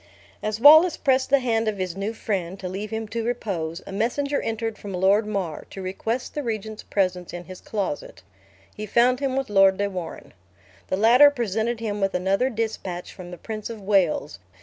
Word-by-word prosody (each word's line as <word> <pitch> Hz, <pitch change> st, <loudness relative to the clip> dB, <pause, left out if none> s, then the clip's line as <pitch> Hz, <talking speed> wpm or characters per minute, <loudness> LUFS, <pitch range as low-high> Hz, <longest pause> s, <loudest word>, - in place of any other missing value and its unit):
As 215 Hz, 0 st, -2 dB
Wallace 315 Hz, +5 st, +8 dB
pressed 265 Hz, -3 st, +1 dB
the 280 Hz, 0 st, +4 dB
hand 225 Hz, -2 st, 0 dB
of 215 Hz, -2 st, -1 dB
his 185 Hz, -2 st, -3 dB
new 200 Hz, +3 st, -3 dB
friend, 195 Hz, -5 st, -3 dB
to 185 Hz, -, -5 dB
leave 195 Hz, +3 st, -5 dB
him 220 Hz, 0 st, -4 dB
to 230 Hz, +1 st, -3 dB
repose, 190 Hz, -9 st, -3 dB
a -, -, -9 dB
messenger 265 Hz, +8 st, -1 dB
entered 225 Hz, 0 st, -3 dB
from 200 Hz, -2 st, -6 dB
Lord 195 Hz, +4 st, +3 dB
Mar, 190 Hz, -7 st, -3 dB
to -, -, -9 dB
request 220 Hz, +6 st, -3 dB
the 295 Hz, -, -2 dB
regent's 220 Hz, -3 st, -4 dB
presence 185 Hz, -3 st, -1 dB
in 175 Hz, 0 st, -6 dB
his 185 Hz, 0 st, -11 dB
closet. 195 Hz, -, -4 dB, 0.5 s
He 215 Hz, 0 st, -6 dB
found 245 Hz, +4 st, +3 dB
him 270 Hz, -2 st, -1 dB
with 270 Hz, 0 st, -1 dB
Lord 195 Hz, -2 st, +4 dB
de 205 Hz, -, 0 dB
Warenne. 180 Hz, -3 st, -7 dB, 0.5 s
The 185 Hz, -, -1 dB
latter 240 Hz, +7 st, +7 dB
presented 235 Hz, -3 st, -2 dB
him 210 Hz, -2 st, -3 dB
with 195 Hz, -1 st, 0 dB
another 195 Hz, +8 st, +1 dB
dispatch 215 Hz, -6 st, -4 dB
from 180 Hz, -2 st, -10 dB
the 175 Hz, -, -8 dB
Prince 215 Hz, +2 st, -6 dB
of 230 Hz, -2 st, -7 dB
Wales. 190 Hz, -, +1 dB
210 Hz, 195 wpm, -24 LUFS, 190-235 Hz, 0.5 s, Wallace